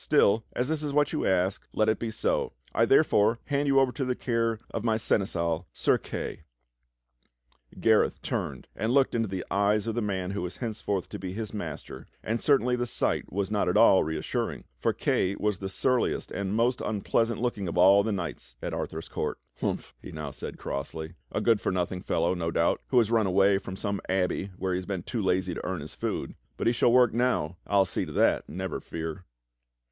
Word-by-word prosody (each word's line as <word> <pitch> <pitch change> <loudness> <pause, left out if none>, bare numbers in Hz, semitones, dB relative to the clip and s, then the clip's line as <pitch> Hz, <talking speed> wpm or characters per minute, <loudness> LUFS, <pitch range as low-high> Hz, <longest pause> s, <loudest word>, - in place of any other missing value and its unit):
Still, 110 +3 +4
as 125 - -1
this 155 0 -1
is 145 -2 -3
what 145 +1 +2
you 155 - 0
ask, 95 +1 +1
let 110 - +2
it 110 - +2
be 115 - -2
so. 110 - -1 0.2
I - - +4
therefore 105 +3 +4
hand 145 0 0
you 135 -1 +5
over 135 -1 +3
to 135 - -3
the 125 -1 0
care 115 -2 0
of 110 - -3
my 110 -2 +2
Seneschal, 85 -5 0
Sir - - +2
Kay." - - -5 1.4
Gareth - - +3
turned 65 - -3
and 110 - -1
looked 135 -1 +4
into 115 -1 +1
the 95 -1 -4
eyes 100 +1 +2
of 115 - -1
the 120 - -1
man 95 -3 -2
who 100 - -3
was 90 0 -5
henceforth 105 -3 -2
to - - -6
be 95 -1 -5
his 110 +1 -5
master, 85 -8 -6 0.2
and 115 +1 -1
certainly 125 -4 +3
the 120 0 -1
sight - - -1
was 100 +1 -2
not 100 -4 +1
at - - +2
all 95 - +7
reassuring, 80 +1 -3 0.2
for - - +2
Kay 95 +2 0
was 105 -2 -1
the 95 - -4
surliest 125 +5 0
and 100 0 -2
most 120 +2 +2
unpleasant 110 +2 0
looking 115 -5 -1
of 85 - -3
all 95 +3 +7
the 110 +2 -1
knights 90 -5 -5
at - - -4
Arthur's 80 +1 -4
court. - - -3 0.2
"Humph!" - - -3
he - - -9
now 75 -2 -5
said - - -7
crossly. 80 +4 -5 0.2
"A - - -1
good 115 -3 +3
for - - 0
nothing 90 0 -1
fellow, 85 +1 +1
no 85 -2 -2
doubt, 85 0 +1
who 130 - +1
has 115 -2 +4
run 110 -3 +3
away 95 +1 +4
from 95 -1 -7
some 100 0 -3
abbey 95 +1 0
where 95 0 -1
he 90 +1 -1
was 95 -2 -4
too 115 - -2
lazy 95 -1 +1
to - - -6
earn 95 -1 -2
his 75 - -9
food. - - -3 0.2
But - - -3
he 115 - +4
shall 120 0 +3
work 125 -1 +5
now. 115 -9 +1
I'll 100 -1 +4
see - - -2
to - - -7
that, - - +2
never - - -4
fear!" 80 +3 -6
100 Hz, 210 wpm, -28 LUFS, 90-115 Hz, 1.4 s, all